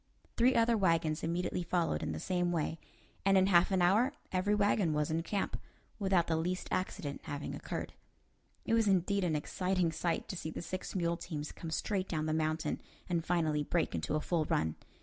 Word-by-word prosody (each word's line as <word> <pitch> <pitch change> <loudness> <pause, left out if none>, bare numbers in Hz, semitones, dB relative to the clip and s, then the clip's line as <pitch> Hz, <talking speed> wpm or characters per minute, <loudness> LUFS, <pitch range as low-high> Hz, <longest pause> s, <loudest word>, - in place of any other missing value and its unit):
Three 250 +2 +4
other 230 0 +4
wagons 165 -6 +2
immediately 175 +2 -1
followed 170 - 0
in - - -2
the 80 - -4
same 175 - 0
way, 165 -1 -1 0.4
and 195 0 +5
in 190 - +5
half 180 -2 +5
an 190 -2 +2
hour 220 +10 +4 0.2
every 190 +3 +2
wagon 205 -5 +2
was 150 0 0
in 160 +1 +1
camp, 195 +4 -2 0.4
without 190 -4 +3
the 160 - 0
least 180 +3 -2
accident 145 -6 -2
having 145 0 -4
occurred. - - -5 0.7
It - - 0
was 225 -1 +4
indeed 195 +1 +2
an 165 -3 +1
exciting 180 +3 0
sight 165 +1 -1
to - - -3
see 165 -3 -4
the 160 - -6
six 185 +4 -5
mule 170 -2 +1
teams 150 -4 -5
come 165 - -7
straight 190 +3 -1
down 155 -2 -1
the 155 - 0
mountain 155 0 -1 0.3
and 170 -2 0
finally 160 -4 +1
break 165 +3 0
into 80 - -1
a 155 - 0
full 165 -2 0
run. 80 - +1
175 Hz, 195 wpm, -33 LUFS, 160-190 Hz, 0.7 s, and